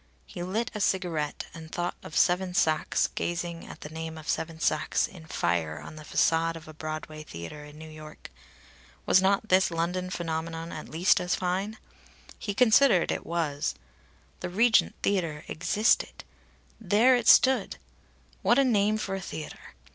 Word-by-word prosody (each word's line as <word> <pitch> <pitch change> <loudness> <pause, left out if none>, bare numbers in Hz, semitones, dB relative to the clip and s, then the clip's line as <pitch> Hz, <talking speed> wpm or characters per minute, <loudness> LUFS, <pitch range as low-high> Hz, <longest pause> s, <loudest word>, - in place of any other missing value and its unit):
He 175 - -8
lit 210 +6 -2
a 210 - -4
cigarette, 175 -7 -1
and 160 -1 -10
thought 175 0 -2
of - - -6
Seven 180 0 +2
Sachs 155 -3 +2
gazing 170 -1 -4
at - - -11
the 150 - -7
name 160 0 -6
of 155 - -11
Seven 160 0 -2
Sachs - - +1
in 180 -8 -12
fire 80 - -1
on 75 - -10
the 155 - -10
façade 165 +2 +1
of 160 -1 -10
a 155 - -10
Broadway 155 0 -6
theatre 85 - -8
in 150 0 -13
New 160 +1 -10
York. 155 - -11 0.7
Was 185 - +5
not 195 +3 +1
this 185 +1 +4
London 175 +2 -2
phenomenon 165 -1 -4
at 155 - -7
least 175 +5 +3
as 180 0 0
fine? 190 +4 -2 0.6
He 205 -2 -4
considered 225 -5 +5
it - - -4
was. 155 -4 -1 0.6
The - - -4
Regent 225 +5 +3
Theatre 165 -7 -1
existed 205 +7 +1 0.6
there 225 +5 +4
it 240 -2 -1
stood! 265 0 +5 0.6
(What 240 - +4
a 275 - +5
name 215 -4 +2
for 200 -2 -3
a 195 - -3
theatre!) 155 - -8
170 Hz, 160 wpm, -28 LUFS, 155-195 Hz, 0.7 s, Was